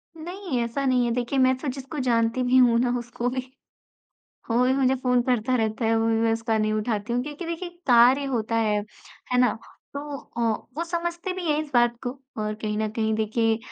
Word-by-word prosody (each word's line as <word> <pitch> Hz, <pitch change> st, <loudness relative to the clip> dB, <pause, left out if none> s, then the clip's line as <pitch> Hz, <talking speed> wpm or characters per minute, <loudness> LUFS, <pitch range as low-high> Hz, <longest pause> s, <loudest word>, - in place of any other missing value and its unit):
नहीं, 345 Hz, -3 st, -4 dB
ऐसा 255 Hz, +4 st, -2 dB
नहीं 250 Hz, -2 st, +3 dB
है। 235 Hz, -, 0 dB
देखिए, 245 Hz, +3 st, -1 dB
मैं 260 Hz, 0 st, +4 dB
तो 285 Hz, -, -6 dB
जिसको 270 Hz, +3 st, -5 dB
जानती 230 Hz, +1 st, +2 dB
भी 250 Hz, +1 st, +3 dB
हूँ 240 Hz, -2 st, +5 dB
ना, 245 Hz, 0 st, +1 dB
उसको 240 Hz, 0 st, -3 dB
भी 255 Hz, 0 st, -5 dB, 1.0 s
वो 240 Hz, +2 st, +3 dB
भी 260 Hz, -, +3 dB
मुझे 265 Hz, -1 st, +2 dB
फ़ोन 250 Hz, -1 st, +2 dB
करता 250 Hz, 0 st, +1 dB
रहता 220 Hz, 0 st, 0 dB
है, 225 Hz, -, +3 dB
वो 225 Hz, 0 st, +1 dB
भी 225 Hz, 0 st, +2 dB
मैं 225 Hz, 0 st, +3 dB
उसका 225 Hz, 0 st, 0 dB
नहीं 215 Hz, 0 st, +1 dB
उठाती 215 Hz, +1 st, -2 dB
हूँ 245 Hz, -, +1 dB
क्योंकि 295 Hz, +4 st, -7 dB
देखिए, 335 Hz, +2 st, -4 dB, 0.2 s
कार्य 250 Hz, +3 st, +6 dB
होता 230 Hz, -4 st, -1 dB
है, 215 Hz, -2 st, +2 dB, 0.5 s
है 250 Hz, -, +2 dB
ना। 245 Hz, -3 st, +3 dB, 0.4 s
तो 285 Hz, 0 st, -5 dB
अ, 240 Hz, -, -11 dB, 0.4 s
वो 335 Hz, -, 0 dB
समझते 345 Hz, +1 st, -3 dB
भी 365 Hz, -1 st, -5 dB
हैं 295 Hz, -, +1 dB
इस 295 Hz, -, -12 dB
बात 240 Hz, -1 st, +4 dB
को, 245 Hz, -, -1 dB, 0.3 s
और 215 Hz, 0 st, -2 dB
कहीं 215 Hz, -1 st, -3 dB
न 220 Hz, -, 0 dB
कहीं 220 Hz, -1 st, 0 dB
देखिए 220 Hz, +1 st, +1 dB
245 Hz, 215 wpm, -25 LUFS, 225-270 Hz, 1.0 s, कार्य